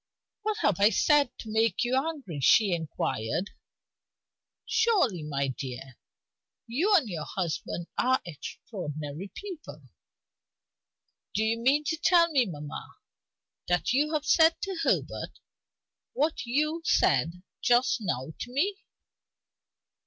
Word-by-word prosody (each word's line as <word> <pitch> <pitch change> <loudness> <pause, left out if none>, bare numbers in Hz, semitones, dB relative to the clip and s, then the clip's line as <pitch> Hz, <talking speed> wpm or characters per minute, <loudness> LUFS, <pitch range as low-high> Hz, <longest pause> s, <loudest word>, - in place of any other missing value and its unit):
"What 430 0 -1
have 200 -4 +2
I 205 +1 +6
said 290 +5 +3
to 220 - -8
make 220 -2 +2
you 245 +1 0
angry?" 270 - -2
she 195 - +5
inquired. 160 - -2 1.1
"Surely, 400 - +2
my 140 -2 -2
dear, 130 -1 -7 0.7
you 335 - +2
and 305 -11 +3
your 165 -6 -4
husband 175 -1 -3
are 260 +1 +3
extraordinary 155 0 -7
people." 310 - -8 1.5
"Do 215 - +2
you 225 +1 0
mean 275 +5 +3
to 320 +2 -1
tell 340 0 +4
me, 260 -6 +3
mamma, 150 -4 -8 0.7
that 175 +6 +1
you 295 +4 +2
have 300 -1 -1
said 320 +2 +5
to 380 -3 -3
Herbert - - -1 0.8
what 300 -3 -1
you 305 +6 0
said 170 - +2 0.2
just 245 +1 +3
now 155 - -3
to 245 - -6
me?" 380 +10 0
230 Hz, 120 wpm, -28 LUFS, -, 1.5 s, I